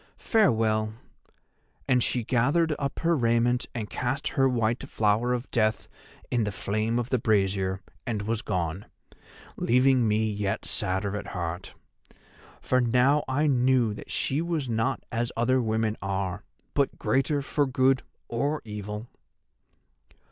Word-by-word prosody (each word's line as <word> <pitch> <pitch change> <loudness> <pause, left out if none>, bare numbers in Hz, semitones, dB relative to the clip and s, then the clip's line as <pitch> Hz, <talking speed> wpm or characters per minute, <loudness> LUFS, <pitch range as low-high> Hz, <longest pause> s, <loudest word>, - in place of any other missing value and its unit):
Farewell.' 110 - +2 0.9
And 125 -1 +3
she 120 - 0
gathered 140 +8 +2
up 140 -1 -3
her 170 0 +3
raiment 120 -1 +2
and 110 -3 -3
cast 125 +6 -2
her 135 -2 +2
white 115 -1 0
flower 110 +3 +1
of 125 +1 -2
death 110 -2 +1 0.4
in 120 -2 +2
the 105 - -1
flame 110 +4 -1
of 120 0 -2
the 130 - +2
brazier, 95 -3 +1 0.3
and 110 -4 -2
was 110 +1 -1
gone, 90 -1 -3 0.7
leaving 125 0 +3
me 110 +1 +2
yet 105 -2 -2
sadder 95 +2 0
at 105 - -5
heart. 90 +1 -4 0.9
For 130 0 +2
now 125 +5 +3
I 145 +4 +1
knew 125 -5 +3
that - - -10
she 140 +4 0
was 165 -5 -2
not 115 -1 -1
as 120 0 -1
other 130 +2 +2
women 110 -1 0
are, 95 0 -2 0.3
but 140 -2 +1
greater 140 +1 +1
for 145 +1 +1
good 130 0 +3 0.3
or 140 +6 -1
evil. 105 +1 -6
115 Hz, 140 wpm, -27 LUFS, 105-130 Hz, 0.9 s, And